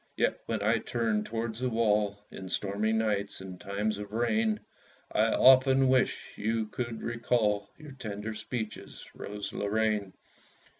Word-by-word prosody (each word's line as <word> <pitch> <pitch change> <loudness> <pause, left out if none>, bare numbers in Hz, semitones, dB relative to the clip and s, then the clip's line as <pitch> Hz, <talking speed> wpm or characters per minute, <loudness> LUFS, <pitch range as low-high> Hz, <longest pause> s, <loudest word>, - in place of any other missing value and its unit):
Yet - - +1
when 110 -3 -1
I 110 +2 +3
turn 110 -2 0
towards 115 0 -3
the 130 0 0
wall, 105 -3 +2
In 95 -1 -8
stormy 100 +3 0
nights, 105 -2 0
in 95 -1 -8
times 105 +2 -2
of 105 0 -7
rain, 110 -2 +1 0.5
I - - +3
often 130 0 +6
wish 130 -1 +1
you 110 +1 0
could 115 +1 -5
recall 115 -3 +1
Your 155 -2 -11
tender 110 -4 -5
speeches, 110 0 -6
Rose 105 0 -6
Lorraine. 105 -1 0
110 Hz, 140 wpm, -30 LUFS, 105-115 Hz, 0.5 s, often